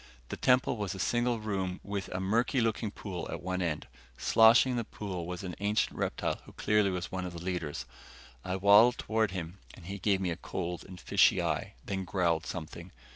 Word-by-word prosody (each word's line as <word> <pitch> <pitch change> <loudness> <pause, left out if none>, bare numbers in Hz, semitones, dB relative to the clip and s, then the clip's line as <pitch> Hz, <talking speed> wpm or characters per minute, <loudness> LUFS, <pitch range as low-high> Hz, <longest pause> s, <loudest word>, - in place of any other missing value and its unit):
The - - -3
temple 125 -1 +3
was 100 -3 -3
a - - -8
single 120 +3 +1
room 95 -4 -2
with 100 -2 -4
a 90 - -4
murky 115 +7 +1
looking 115 -1 0
pool 95 -3 -6
at - - -5
one 95 0 -2
end. 80 -4 -2 0.3
Sloshing 115 +3 +6
in 125 - -1
the 120 - 0
pool 95 -6 -6
was 90 +1 -5
an 90 -2 -5
ancient 105 +2 +1
reptile - - -2
who - - -14
clearly 105 -2 +2
was 90 -2 -3
one 95 -1 -3
of 90 -1 -5
the 85 0 -7
leaders. 90 -5 -3 0.6
I 95 0 -2
waddled 105 +5 +6
toward 110 -1 0
him 90 0 -6 0.2
and 85 - -14
he 100 +2 -5
gave 95 0 +2
me 90 -2 -1
a 85 - -3
cold 85 0 -4
and 90 -1 -11
fishy - - +4
eye, - - -2
then 95 -1 -2
growled 85 -4 0
something. 85 +2 -7
95 Hz, 205 wpm, -30 LUFS, 90-105 Hz, 0.6 s, Sloshing